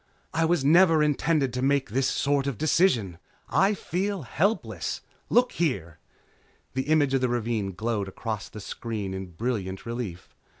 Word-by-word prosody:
"I 165 Hz, 0 st, +2 dB
was 160 Hz, -4 st, +1 dB
never 165 Hz, 0 st, +6 dB
intended 150 Hz, -2 st, +1 dB
to 125 Hz, -, -2 dB
make 135 Hz, -2 st, +1 dB
this 130 Hz, +3 st, +1 dB
sort 140 Hz, 0 st, +1 dB
of 135 Hz, -6 st, -2 dB
decisions. 125 Hz, -, +2 dB, 0.3 s
I 200 Hz, +2 st, +3 dB
feel 195 Hz, -1 st, -2 dB
helpless. 195 Hz, -, -1 dB, 0.3 s
Look 245 Hz, +1 st, +4 dB
here 85 Hz, -, -2 dB, 0.4 s
" -, -, -36 dB
The 130 Hz, +1 st, -2 dB
image 145 Hz, -3 st, +3 dB
of 135 Hz, -, +2 dB
the 125 Hz, -, +2 dB
ravine 115 Hz, -5 st, -1 dB
glowed 110 Hz, 0 st, -2 dB
across 105 Hz, +1 st, -5 dB
the 105 Hz, -, -9 dB
screen 105 Hz, -2 st, -4 dB
in 95 Hz, 0 st, -5 dB
brilliant 100 Hz, -2 st, -3 dB
relief. 115 Hz, -7 st, -6 dB
130 Hz, 160 wpm, -26 LUFS, 105-155 Hz, 0.4 s, never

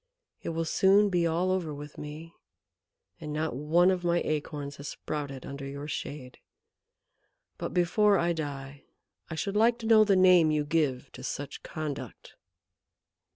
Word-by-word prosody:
It -, -, -4 dB
will 165 Hz, 0 st, -2 dB
soon 195 Hz, +5 st, +4 dB
be 175 Hz, -2 st, +2 dB
all 175 Hz, +3 st, +1 dB
over 170 Hz, -5 st, -1 dB
with 145 Hz, +1 st, -9 dB
me, 155 Hz, +3 st, -8 dB, 0.9 s
and 155 Hz, -3 st, -6 dB
not 155 Hz, -3 st, -2 dB
one 165 Hz, +6 st, +3 dB
of 180 Hz, -1 st, -2 dB
my 175 Hz, 0 st, +2 dB
acorns 145 Hz, -2 st, -3 dB
has 140 Hz, -, -8 dB
sprouted 140 Hz, -4 st, -5 dB
under 140 Hz, 0 st, -7 dB
your 140 Hz, +1 st, -6 dB
shade. 135 Hz, -3 st, -6 dB, 1.2 s
But -, -, -3 dB
before 200 Hz, +4 st, +3 dB
I 170 Hz, 0 st, +1 dB
die 140 Hz, -3 st, -6 dB, 0.4 s
I 160 Hz, -, -4 dB
should 195 Hz, +6 st, -3 dB
like 230 Hz, +2 st, +4 dB
to 230 Hz, -, -8 dB
know 220 Hz, -1 st, +7 dB
the 205 Hz, -2 st, +3 dB
name 180 Hz, -3 st, +6 dB
you 150 Hz, -1 st, +1 dB
give 145 Hz, -5 st, 0 dB
to 130 Hz, -, -11 dB
such 140 Hz, +2 st, -5 dB
conduct." 155 Hz, -3 st, -6 dB
155 Hz, 155 wpm, -29 LUFS, 145-180 Hz, 1.2 s, know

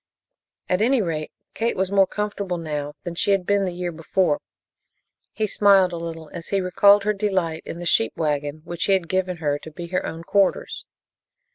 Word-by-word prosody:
At 180 Hz, +2 st, +1 dB
any 255 Hz, +4 st, +3 dB
rate, 160 Hz, -6 st, -2 dB, 0.2 s
Kate 230 Hz, -1 st, -1 dB
was 190 Hz, 0 st, 0 dB
more 195 Hz, -1 st, +4 dB
comfortable 200 Hz, -3 st, -3 dB
now 150 Hz, -3 st, -4 dB
than 175 Hz, -, -5 dB
she 170 Hz, -, 0 dB
had 195 Hz, -2 st, 0 dB
been 200 Hz, 0 st, +2 dB
the 185 Hz, -, -2 dB
year 175 Hz, 0 st, -4 dB
before. 185 Hz, -, 0 dB, 0.9 s
He 220 Hz, -, -1 dB
smiled 195 Hz, -3 st, +4 dB
a -, -, -3 dB
little 165 Hz, -2 st, -7 dB
as 170 Hz, -1 st, -7 dB
he 200 Hz, -, +1 dB
recalled 200 Hz, +2 st, +5 dB
her 210 Hz, +1 st, +1 dB
delight 185 Hz, -6 st, -1 dB
in -, -, -6 dB
the 175 Hz, -, -6 dB
sheep 115 Hz, -9 st, +3 dB
wagon 150 Hz, -1 st, -1 dB
which 170 Hz, 0 st, -2 dB
he 195 Hz, -, +3 dB
had 185 Hz, -3 st, +1 dB
given 185 Hz, 0 st, -1 dB
her 145 Hz, -3 st, -1 dB
to 160 Hz, -, -10 dB
be 170 Hz, +2 st, -8 dB
her 185 Hz, +1 st, -1 dB
own 165 Hz, +1 st, -6 dB
quarters. 195 Hz, +2 st, 0 dB
180 Hz, 195 wpm, -23 LUFS, 165-195 Hz, 0.9 s, recalled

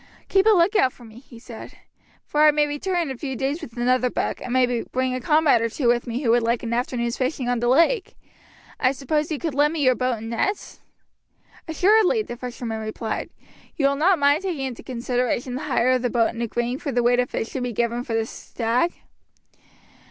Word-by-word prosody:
"Keep 390 Hz, +2 st, +3 dB
a -, -, +8 dB
lookout 370 Hz, -, +4 dB
for 240 Hz, -, -16 dB
me," 220 Hz, +1 st, -13 dB
he 250 Hz, -2 st, -15 dB
said, 230 Hz, -1 st, -11 dB, 0.5 s
"for 300 Hz, -, 0 dB
I 305 Hz, -, +8 dB
may 300 Hz, 0 st, +3 dB
return 295 Hz, +6 st, -2 dB
in 290 Hz, -, -4 dB
a -, -, -5 dB
few 265 Hz, 0 st, -4 dB
days 270 Hz, +6 st, -2 dB
with 230 Hz, -, -10 dB
another 250 Hz, +1 st, +2 dB
buck, -, -, -3 dB
and 250 Hz, -, -6 dB
may 250 Hz, -2 st, +2 dB
bring 255 Hz, 0 st, -2 dB
a 255 Hz, -, -3 dB
comrade 300 Hz, -3 st, +3 dB
or 230 Hz, -, 0 dB
two 250 Hz, +2 st, -2 dB
with 240 Hz, 0 st, +2 dB
me 240 Hz, +4 st, -3 dB
who 230 Hz, -, +3 dB
would 240 Hz, +1 st, +4 dB
like 230 Hz, +1 st, 0 dB
an 235 Hz, 0 st, -3 dB
afternoon's 235 Hz, -1 st, -1 dB
fishing 260 Hz, -1 st, -2 dB
on 245 Hz, -1 st, 0 dB
the 240 Hz, -, 0 dB
lake. 335 Hz, -, +2 dB, 0.6 s
I 255 Hz, -, +2 dB
suppose 300 Hz, +4 st, -2 dB
you 310 Hz, -, -1 dB
could 320 Hz, 0 st, -3 dB
lend 295 Hz, +3 st, +2 dB
me 310 Hz, -3 st, -1 dB
your 255 Hz, -1 st, +5 dB
boat 250 Hz, -1 st, -1 dB
and 225 Hz, +1 st, -7 dB
nets?" 400 Hz, -, -2 dB, 0.9 s
"Assuredly," 425 Hz, +6 st, +3 dB
the 240 Hz, -, -7 dB
fisherman 240 Hz, -2 st, -5 dB
replied. 220 Hz, +1 st, -4 dB, 0.5 s
"You 275 Hz, -2 st, +2 dB
will 280 Hz, -, 0 dB
not 350 Hz, +6 st, +3 dB
mind 285 Hz, +2 st, +3 dB
taking 340 Hz, -8 st, -3 dB
into 250 Hz, -3 st, -6 dB
consideration 250 Hz, 0 st, -2 dB
the 260 Hz, -, -4 dB
hire 255 Hz, -3 st, +2 dB
of 255 Hz, -1 st, +2 dB
the 245 Hz, -, 0 dB
boat 230 Hz, -1 st, +1 dB
in 230 Hz, -, -6 dB
agreeing 240 Hz, +2 st, -2 dB
for 280 Hz, -, -4 dB
the 245 Hz, -1 st, +1 dB
weight 245 Hz, +1 st, +3 dB
of 250 Hz, -, 0 dB
fish 225 Hz, -, -3 dB
to 265 Hz, -, -4 dB
be 245 Hz, 0 st, -2 dB
given 235 Hz, +2 st, -1 dB
for 230 Hz, -3 st, -3 dB
the 225 Hz, 0 st, 0 dB
stag?" 240 Hz, +8 st, -2 dB
255 Hz, 225 wpm, -23 LUFS, 240-295 Hz, 0.9 s, a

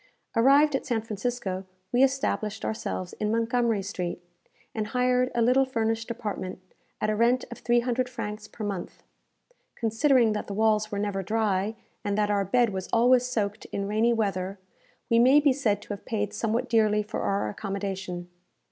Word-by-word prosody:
Arrived 275 Hz, +5 st, +5 dB
at -, -, -1 dB
San 240 Hz, -5 st, 0 dB
Francisco, 215 Hz, -3 st, -3 dB, 0.3 s
we 245 Hz, -, +3 dB
established 260 Hz, -5 st, 0 dB
ourselves 185 Hz, -4 st, -3 dB
in 210 Hz, -, 0 dB
Montgomery 230 Hz, -1 st, +1 dB
Street, 185 Hz, -4 st, -4 dB, 0.5 s
and 215 Hz, -1 st, -2 dB
hired 250 Hz, +1 st, +2 dB
a 235 Hz, -, +3 dB
little 255 Hz, +3 st, +4 dB
furnished 225 Hz, -3 st, -1 dB
apartment, 210 Hz, -5 st, -4 dB, 0.4 s
at 215 Hz, -, 0 dB
a -, -, 0 dB
rent 240 Hz, +3 st, +2 dB
of -, -, -8 dB
three 240 Hz, 0 st, +2 dB
hundred 250 Hz, +1 st, -1 dB
francs 215 Hz, -3 st, -6 dB
per 215 Hz, -, -7 dB
month. 195 Hz, -4 st, -5 dB, 0.7 s
Considering 230 Hz, 0 st, +3 dB
that 210 Hz, -, -4 dB
the 200 Hz, -, -5 dB
walls 215 Hz, 0 st, +2 dB
were 205 Hz, -, -2 dB
never 200 Hz, -1 st, -1 dB
dry, 210 Hz, 0 st, 0 dB, 0.3 s
and 205 Hz, 0 st, -1 dB
that 210 Hz, -1 st, +2 dB
our 200 Hz, -1 st, +2 dB
bed 235 Hz, +3 st, +2 dB
was 190 Hz, -1 st, -5 dB
always 245 Hz, +2 st, +4 dB
soaked 210 Hz, -4 st, -2 dB
in 200 Hz, 0 st, -4 dB
rainy 220 Hz, +3 st, +2 dB
weather, 195 Hz, -4 st, -1 dB, 0.5 s
we 230 Hz, -, +4 dB
may 260 Hz, +5 st, +7 dB
be 290 Hz, -2 st, +4 dB
said 220 Hz, -7 st, 0 dB
to -, -, -18 dB
have 205 Hz, -1 st, -5 dB
paid 210 Hz, -2 st, -2 dB
somewhat 225 Hz, +2 st, -1 dB
dearly 215 Hz, -2 st, +3 dB
for 210 Hz, -, -5 dB
our 195 Hz, -, 0 dB
accommodation. 190 Hz, -, -4 dB
220 Hz, 175 wpm, -27 LUFS, 205-240 Hz, 0.7 s, may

